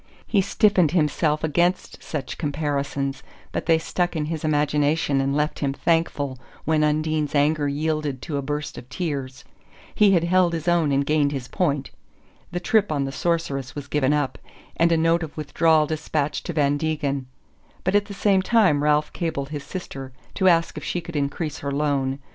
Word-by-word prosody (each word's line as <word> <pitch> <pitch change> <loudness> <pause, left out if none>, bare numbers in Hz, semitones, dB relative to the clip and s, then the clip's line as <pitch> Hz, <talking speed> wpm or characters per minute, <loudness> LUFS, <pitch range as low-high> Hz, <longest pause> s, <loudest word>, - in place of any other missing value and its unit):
He 205 - +2
stiffened 190 -4 +3
himself 155 -2 +1
against 175 +4 0
such 145 -4 -5
comparisons, 140 -2 -2 0.3
but - - -4
they 165 -1 +5
stuck 175 +2 -1
in 155 -2 -1
his 160 0 -4
imagination 150 -1 +1
and 135 +1 0
left 150 +1 0
him 140 -2 0
thankful 145 -5 0 0.3
when 155 0 +2
Undine's 155 0 0
anger 145 +1 +2
yielded 150 -1 -1
to 145 - -3
a - - -1
burst 145 +2 -4
of 125 - -15
tears. 140 -7 -4 0.5
He 210 -1 +5
had 170 -3 +3
held 175 0 +3
his 165 0 -4
own 170 -4 +3
and 140 0 +2
gained 150 -1 +2
his 135 -3 -4
point. 145 -5 -1 0.6
The 175 - -2
trip 210 +1 +2
on 140 -2 0
the 135 - -4
Sorceress 135 -5 -2
was 145 -2 -5
given 145 -2 +1
up, 145 -2 0 0.4
and 170 0 +3
a 165 - +4
note 165 +1 +3
of 160 -2 -7
withdrawal 155 +1 +3
despatched 150 -1 -2
to 175 - -3
Van 145 -2 +2
Degen; 145 -4 -2 0.6
but 185 - 0
at 205 0 +3
the 200 -1 -8
same 195 -1 +3
time 190 -9 +3
Ralph 150 0 +2
cabled 155 -5 -3
his 145 -2 -5
sister 135 -8 -7 0.2
to 190 - +2
ask 165 -1 +2
if - - -13
she 180 - -2
could 170 -1 -9
increase 145 +2 -2
her 140 - -3
loan. 140 -2 0
150 Hz, 185 wpm, -23 LUFS, 140-165 Hz, 0.6 s, they